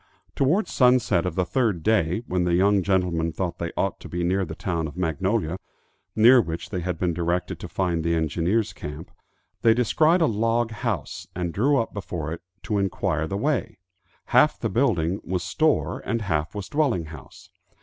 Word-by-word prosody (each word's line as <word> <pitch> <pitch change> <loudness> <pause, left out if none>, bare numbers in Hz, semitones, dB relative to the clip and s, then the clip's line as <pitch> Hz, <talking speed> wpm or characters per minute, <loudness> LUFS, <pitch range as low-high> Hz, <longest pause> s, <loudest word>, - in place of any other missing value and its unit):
Towards 160 +11 +1
sunset 125 -9 +3
of 85 - -4
the 90 - +1
third 110 - 0
day, 110 -1 +1
when 90 0 0
the 85 -1 +2
young 100 +2 +3
gentlemen 90 -3 0
thought 90 +1 -4
they 85 -1 -3
ought - - -1
to - - -10
be 90 0 -2
near 95 +3 +1
the 80 - -7
town 85 -3 -2
of 80 - -11
Magnolia, 90 +1 -1 0.6
near 120 +3 +7
which 85 -4 -6
they 95 - -2
had 90 -1 -3
been 90 0 0
directed 85 +1 -2
to - - -7
find 85 -4 -1
the 85 0 +1
engineers' 85 +7 0
camp, 75 +2 -8 0.5
they 115 -1 +5
descried 155 +8 +3
a - - +5
log 115 -1 +1
house 110 - -4
and 90 -2 -3
drew 140 +7 +2
up 115 - -1
before 85 -6 -4
it 85 - -8 0.2
to 105 -2 -1
enquire 80 -5 -1
the 100 - -3
way. 120 -3 -1 0.6
Half - - +5
the - - -1
building 95 -6 +1
was 90 -1 -2
store, 155 - +1
and 115 -2 -2
half 80 -2 -2
was 100 -2 -5
dwelling 135 - 0
house. 75 - -13
95 Hz, 185 wpm, -24 LUFS, 85-115 Hz, 0.6 s, near